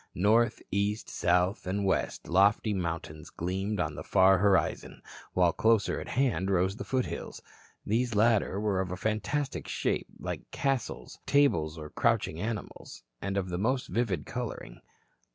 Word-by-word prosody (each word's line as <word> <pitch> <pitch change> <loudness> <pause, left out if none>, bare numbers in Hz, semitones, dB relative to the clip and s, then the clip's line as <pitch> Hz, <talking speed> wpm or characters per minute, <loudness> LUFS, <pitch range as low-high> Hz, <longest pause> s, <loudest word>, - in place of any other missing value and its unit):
North, 110 +6 +3
east, 100 +2 -1
south 90 +3 +1
and 100 +2 -1
west 95 - -1
lofty 100 +4 +3
mountains 85 -3 -4
gleamed 95 +4 -3
on - - -1
the - - -7
far 95 0 +5
horizon, 95 -5 +1 0.3
while 90 -2 +3
closer 110 -2 +2
at - - -7
hand 115 -8 0
rose 95 +1 +2
the - - -5
foothills. 130 -2 -3 0.4
These 115 +2 0
latter 105 -2 +3
were 100 -3 +1
of 90 -1 -4
fantastic 110 - -2
shapes, - - -1
like - - -6
castles, 135 -3 -2
tables 135 - +3
or 75 -1 -8
crouching 80 - +1
animals, 105 - -6 0.2
and 100 +1 -2
of 95 -2 -1
the 90 0 -3
most 125 +5 0
vivid 115 -6 -1
coloring. - - -6
100 Hz, 145 wpm, -29 LUFS, 90-110 Hz, 0.4 s, far